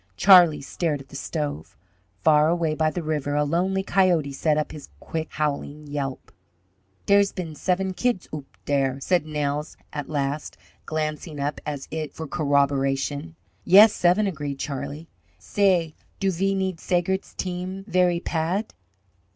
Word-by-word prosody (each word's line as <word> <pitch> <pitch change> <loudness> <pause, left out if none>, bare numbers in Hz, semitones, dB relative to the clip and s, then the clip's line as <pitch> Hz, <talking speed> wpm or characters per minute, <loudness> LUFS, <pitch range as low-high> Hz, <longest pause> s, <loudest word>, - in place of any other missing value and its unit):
Charlie 175 - +7
stared 150 +1 -2
at 135 - -13
the - - -12
stove. 145 - -4 0.5
Far 155 0 +5
away 165 -2 +1
by 155 0 +1
the 175 +2 -4
river 150 -2 -1
a 150 - +3
lonely 185 +6 0
coyote 175 -8 +2
set 150 +2 +1
up 155 - -1
his 150 - -10
quick, 160 -1 -4
howling 150 0 -2
yelp. 140 -2 -5 0.7
"Dere's 200 0 +4
been 170 -4 -5
seven 185 +4 -1
kids 235 0 -1
oop 145 -3 -6 0.2
dere," 135 -2 +1
said 175 +2 +1
Nels 150 0 -2 0.2
at 145 -2 -5
last, 145 0 -2 0.3
glancing 155 0 -3
up 145 +1 -2
as 145 -2 -4
it 155 -1 -4
for 160 - -5
corroboration. 140 +2 0 0.3
"Yes, 205 +4 +8
seven," 180 +4 +3
agreed 145 -7 -3
Charlie. 140 +3 -5 0.3
"Say, 175 - +1 0.3
do 195 -1 +1
ve 195 +3 0
need 190 -3 -2
Seigert's 185 +2 -1
team 185 +1 -4
very 180 -1 +2
pad?" 175 +6 -2
155 Hz, 145 wpm, -24 LUFS, 145-180 Hz, 0.7 s, Yes